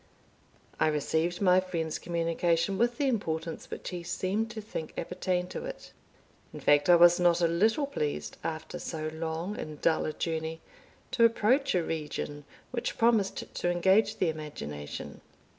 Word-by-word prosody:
I - - +4
received 160 +4 0
my 185 -1 +6
friend's 165 -4 -3
communication 170 +2 0
with 235 +1 +2
the 285 - +1
importance 165 -9 -2
which - - -6
he 180 -1 -5
seemed 195 +6 -1
to 225 - -6
think 205 -7 -6
appertained 180 +1 -2
to - - -5
it. - - -8 0.6
In - - -8
fact, 145 +3 +4
I 175 - +9
was 175 +1 +7
not 175 -1 +4
a 170 - +4
little 220 - +2
pleased, 150 - -3
after 160 +2 -4
so 155 -1 -4
long 165 +5 -3
and 150 -1 -6
dull 160 - +2
a 155 - -3
journey, 160 0 -3 0.5
to 235 - +3
approach 230 +3 +3
a 175 - +2
region 150 -2 -4 0.3
which 240 -2 -3
promised 225 -4 +1
to 175 - -1
engage 190 +5 +3
the 180 - +2
imagination. 75 - -6
175 Hz, 160 wpm, -29 LUFS, 160-205 Hz, 0.6 s, I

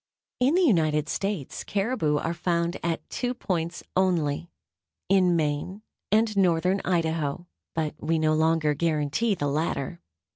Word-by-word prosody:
In 265 +6 +3
the 370 - +4
United 155 - +3
States 195 -7 -3
caribou 195 -8 0
are 165 +3 -1
found 170 0 0
at 170 -1 -2
two 250 0 -2
points 170 -7 -3
only: 170 -4 +1 0.6
in 185 -2 +4
Maine 160 +6 -2 0.3
and 215 0 +3
northern 185 0 +2
Idaho; 165 -2 -1 0.3
but 155 -2 -1
we 165 +1 0
no 155 0 +2
longer 160 -1 +2
guarantee 160 +7 0
the 145 - -2
latter. 150 +1 -2
170 Hz, 135 wpm, -26 LUFS, 155-190 Hz, 0.6 s, the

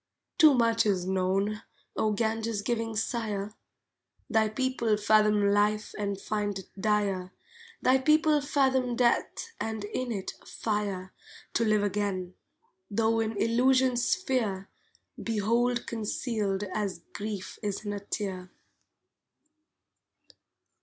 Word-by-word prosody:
Too 310 -4 +8
much 230 -2 +3
is 185 -3 +1
known, 190 +3 0 0.3
O 215 - +1
Ganges 220 0 -1
giving 225 -1 -1
sire; 210 -2 -2 0.8
Thy 220 -1 +3
people 235 -2 0
fathom 210 -1 +4
life 210 +1 +1
and 200 -2 -2
find 205 -1 -2
it 190 - -10
dire, 200 -3 0 0.5
Thy 260 +1 +5
people 305 +1 +4
fathom 265 -3 +1
death, 245 - +1
and, 220 -1 -3
in 240 +4 -3
it, 195 -4 -4
fire 200 -4 -3 0.4
To 230 - +2
live 215 -1 +3
again, 200 -3 -1 0.6
tho 225 +2 +2
in 220 -1 -1
Illusion's 250 +2 +3
sphere, 235 - 0 0.5
Behold 235 +3 +1
concealed 215 -3 -2
as 200 -5 -3
Grief 205 -2 -5
is 205 0 -3
in 205 - -2
a 205 - -3
tear. 195 -2 -4
215 Hz, 110 wpm, -29 LUFS, 200-235 Hz, 0.8 s, Too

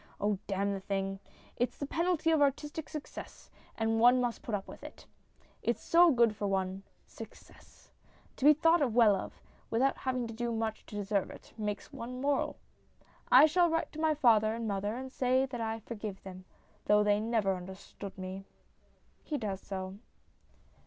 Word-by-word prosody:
Oh, 205 -1 0
damn 200 0 0
the 195 - -3
thing! 195 0 -3 0.4
It's 245 - -1
the 285 - -3
penalty 330 +1 +1
of 315 -2 +3
artistic 295 +2 0
success, 305 -2 -9 0.3
and 225 0 +1
one 245 +2 +6
must 245 -2 -1
put 225 - -2
up 195 - -5
with - - -11
it. - - -11 0.6
It's - - -1
so 345 +1 +6
good 235 -6 +3
for 205 -1 -2
one 190 0 -1 0.2
success. - - -14 0.5
To 270 - -2
be 300 - +10
thought 320 -5 +3
well 225 -4 +6
of, - - -7 0.3
without 265 +4 +1
having 255 -2 -1
to 230 - -7
do 235 +1 -2
much 225 -1 -3
to - - -9
deserve 200 -1 -1
it, - - -13
makes 210 +4 -4
one 250 -1 -6
moral. 280 +1 0 0.7
I 265 +4 +9
shall 345 +3 +3
write 325 0 -1
to 310 - -7
my 315 -1 +2
father 225 -6 +4
and 230 -1 -4
mother 205 +1 -2
and 260 +1 -6
say 260 0 +2
that 250 -3 -6
I 225 0 -3
forgive 210 -3 -7
them, 185 -1 -10 0.4
though 210 0 +4
they 205 0 +3
never 220 -3 +1
understood 190 +2 -9
me. 190 +1 -6 0.8
[He 300 - -3
does 200 -5 -4
so. 190 0 -6
225 Hz, 175 wpm, -31 LUFS, 200-265 Hz, 0.8 s, be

